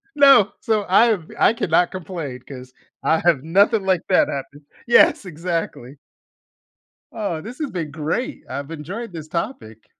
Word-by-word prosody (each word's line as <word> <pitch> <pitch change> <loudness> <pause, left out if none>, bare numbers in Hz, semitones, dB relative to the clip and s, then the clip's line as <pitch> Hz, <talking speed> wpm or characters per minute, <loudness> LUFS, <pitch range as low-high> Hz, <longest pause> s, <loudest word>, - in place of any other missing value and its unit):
No, 275 -8 +6
so 215 -2 0
I 210 +5 +6
have 200 -9 0
I - - +5
cannot 175 -5 +1
complain 165 -8 -6
'cause 130 -2 -10 0.3
I 160 - +2
have 165 -7 +3
nothing 200 +5 +2
like 185 -3 +2
that 185 - +4
happen 140 +1 -7 0.2
Yes, 235 - +5
exactly. 165 -6 -5 1.1
Oh, 200 -7 -3
this 240 +5 -9
has 300 -4 -3
been 165 -5 -4
great. 160 - -4
I've 140 +2 -6
enjoyed 180 +8 -7
this 155 -2 -8
topic. 165 - -5
170 Hz, 150 wpm, -21 LUFS, 150-210 Hz, 1.1 s, No